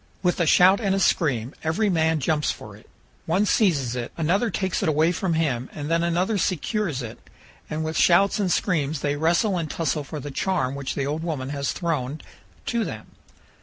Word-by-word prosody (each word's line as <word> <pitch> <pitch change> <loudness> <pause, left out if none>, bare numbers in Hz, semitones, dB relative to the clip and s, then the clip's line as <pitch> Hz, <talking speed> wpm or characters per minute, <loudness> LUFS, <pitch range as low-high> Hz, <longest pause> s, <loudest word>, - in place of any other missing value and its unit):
With 180 0 +1
a 170 - +2
shout 185 +5 +6
and 195 -4 +1
a - - 0
scream, 130 - +1
every 165 +7 +1
man 160 -4 +2
jumps 150 +2 0
for - - -6
it; - - -19 0.4
one 200 +3 +2
seizes 145 - +2
it, 120 -1 -4
another 180 +8 +1
takes 190 -1 -1
it - - +1
away 155 +2 +3
from 175 -1 -1
him, 135 -7 -1
and 150 +1 -4
then 165 0 +2
another 180 +5 0
secures 180 - -1
it; 115 -1 -8 0.5
and 155 +1 -2
with 160 0 -2
shouts 195 +4 +4
and 190 -3 +1
screams 155 -7 0
they 145 0 0
wrestle 170 +5 +1
and 160 -2 -3
tussle 155 -2 -1
for 150 +2 -7
the 145 +1 -7
charm 135 -4 -1
which 140 -1 -4
the 140 - -1
old 150 +3 -2
woman 150 -6 -3
has 140 -1 -2
thrown 155 -4 -2 0.5
to 235 -1 0
them. - - -7
160 Hz, 200 wpm, -24 LUFS, 145-185 Hz, 0.5 s, shout